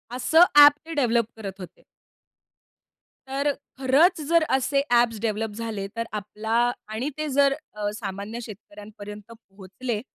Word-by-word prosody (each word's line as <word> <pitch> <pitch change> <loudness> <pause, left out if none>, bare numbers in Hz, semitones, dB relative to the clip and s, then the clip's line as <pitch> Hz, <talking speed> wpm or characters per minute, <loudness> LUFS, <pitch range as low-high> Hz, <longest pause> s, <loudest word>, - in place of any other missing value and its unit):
असं 315 +7 +5
ॲप 290 0 +9
ते 330 - -7
डेव्हलप 240 -6 +2
करत 200 -3 -8
होते. 180 -3 -12 1.4
तर 280 +2 0 0.3
खरंच 310 +7 +3
जर 335 -1 +4
असे 265 +1 +1
ॲप्स 235 -2 +3
डेव्हलप 220 -1 -2
झाले. 220 -3 -4
तर 230 0 -2
आपला 220 +3 -1 0.2
आणि 245 +6 -2
ते 305 0 -3
जर 275 0 +3 0.2
अ, 210 -1 -3
सामान्य 205 +1 -6
शेतकऱ्यांपर्यंत 210 0 -11
पोहोचले, 210 +2 -7
230 Hz, 130 wpm, -24 LUFS, 210-270 Hz, 1.4 s, ॲप